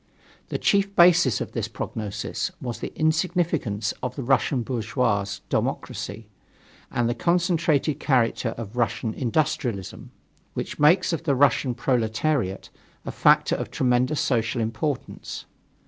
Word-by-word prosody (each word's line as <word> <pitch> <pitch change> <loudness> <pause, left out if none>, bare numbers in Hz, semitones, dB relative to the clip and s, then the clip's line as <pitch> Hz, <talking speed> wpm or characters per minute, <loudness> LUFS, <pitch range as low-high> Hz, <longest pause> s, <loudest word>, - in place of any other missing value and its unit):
The - - -1
chief 200 0 +1
basis 170 -7 +5
of - - -4
this - - -2
prognosis 105 -3 -4
was 120 -3 -5
the - - -5
insignificance 160 - 0
of 125 0 -3
the 135 - -4
Russian 135 0 +2
bourgeois 115 -3 0 0.2
democracy 100 +3 -3 0.6
and 120 -1 0
the 120 - +1
concentrated 165 -2 +1
character 120 -3 +1
of 115 -1 -7
Russian 115 -2 -1
industrialism 120 -6 -2 0.5
which - - -4
makes 170 +5 +4
of 165 - -1
the 140 -3 +2
Russian 130 -2 +3
proletariat 120 -2 0 0.3
a - - -3
factor - - +4
of - - -4
tremendous 125 +3 +1
social 115 -1 0
importance. 115 +5 -3
125 Hz, 125 wpm, -25 LUFS, 115-155 Hz, 0.6 s, basis